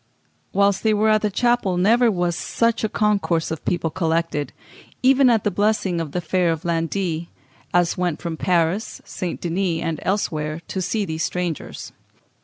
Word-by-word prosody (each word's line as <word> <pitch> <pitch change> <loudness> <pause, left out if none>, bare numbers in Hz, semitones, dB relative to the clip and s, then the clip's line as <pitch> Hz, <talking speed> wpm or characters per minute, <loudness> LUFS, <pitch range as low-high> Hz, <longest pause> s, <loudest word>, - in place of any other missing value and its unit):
Whilst 200 0 +2
they 220 -1 +2
were 215 +1 +3
at 215 -1 +4
the 210 - +1
chapel 225 -3 +1
never 230 +6 +4
was 175 -4 0
such 230 +5 0
a 220 - +1
concourse 200 -7 +1
of 160 - -4
people 170 -2 0
collected, 165 -4 -1 0.5
even 265 0 +5
at 225 -3 +3
the 205 - +1
blessing 205 -5 +1
of 155 -3 -5
the 180 - -2
fair 175 +1 +1
of 165 0 -3
Landit, 170 0 -1 0.4
as 175 0 +2
went 175 -4 0
from 170 -2 -4
Paris, 175 +4 0
St. 180 -2 -4
Denis, 175 -1 -1
and 165 -1 -2
elsewhere, 155 -6 -1
to 190 - -2
see 200 +3 -1
these 160 -2 -4
strangers. 175 -4 -4
180 Hz, 170 wpm, -22 LUFS, 165-210 Hz, 0.5 s, even